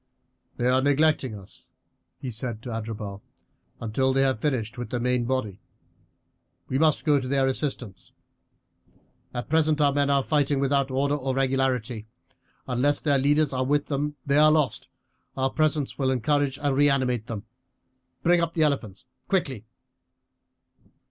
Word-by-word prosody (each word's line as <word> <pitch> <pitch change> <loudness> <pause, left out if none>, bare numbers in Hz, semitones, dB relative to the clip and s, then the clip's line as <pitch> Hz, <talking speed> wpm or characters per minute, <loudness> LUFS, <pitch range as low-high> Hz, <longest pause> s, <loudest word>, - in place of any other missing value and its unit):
"They 120 - -1
are 130 +1 +3
neglecting 145 -3 +2
us," 95 -1 -13 0.5
he 130 - -6
said 115 -1 -3
to 125 - -6
Adherbal, 110 -3 -5 0.6
"until 130 +4 0
they 135 0 +3
have 130 -5 +1
finished 120 -5 -1
with 120 - -5
the 125 - -2
main 125 0 0
body; 115 -6 -2 1.1
we 130 - -1
must 155 -1 +2
go 145 -2 +4
to 130 - -5
their 135 0 +2
assistance. 130 -8 -3 1.2
At 120 -1 -5
present 155 0 +2
our 145 -1 +3
men 140 0 +1
are 140 -1 +3
fighting 145 -2 +1
without 140 0 +1
order 140 +2 0
or 135 -2 -2
regularity. 130 -4 0 0.6
Unless 135 +3 +1
their 145 -3 +2
leaders 145 +1 +2
are 130 0 0
with 145 +2 +1
them 145 +1 -2
they 140 +1 +3
are 155 0 +7
lost, 150 -7 0 0.5
our 130 0 +1
presence 155 -3 0
will 135 -1 +1
encourage 140 +2 +1
and 145 -2 0
reanimate 130 -5 +2
them. 110 -3 -6 0.8
Bring 175 0 +4
up 165 0 -1
the 160 - +2
elephants 130 -9 -1 0.2
quickly." 135 - -1
135 Hz, 150 wpm, -25 LUFS, 125-145 Hz, 1.2 s, are